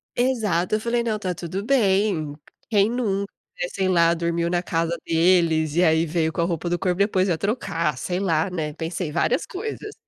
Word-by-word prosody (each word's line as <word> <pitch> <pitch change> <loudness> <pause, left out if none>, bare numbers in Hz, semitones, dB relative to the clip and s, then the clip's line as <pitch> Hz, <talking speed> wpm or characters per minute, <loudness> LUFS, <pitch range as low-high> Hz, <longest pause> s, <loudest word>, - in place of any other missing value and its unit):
Exato, 215 -8 +1
eu - - 0
falei: 235 +1 0
"Não, 220 -2 -1
tá 185 -3 -3
tudo 180 +3 -5
bem, 195 - +2 0.3
quem 205 -2 +3
nunca", 200 -5 -1 0.4
sei 190 -1 0
lá 170 -2 +4
dormiu 170 0 -1
na 175 0 +1
casa 165 -1 -1
deles, 165 -2 +3
e 175 - +4
aí 160 0 +3
veio 160 0 0
com - - -1
a - - +2
roupa 170 0 -2
do 175 - 0
corpo 180 -1 -1
depois 195 -1 +2
ia 170 - +1
trocar, 170 -6 -1
sei 180 0 -2
lá, 165 -3 +1
né, 160 -4 -3
pensei 165 +2 -4
várias 240 - 0
coisas. 425 +1 -6
180 Hz, 190 wpm, -23 LUFS, 165-205 Hz, 0.4 s, lá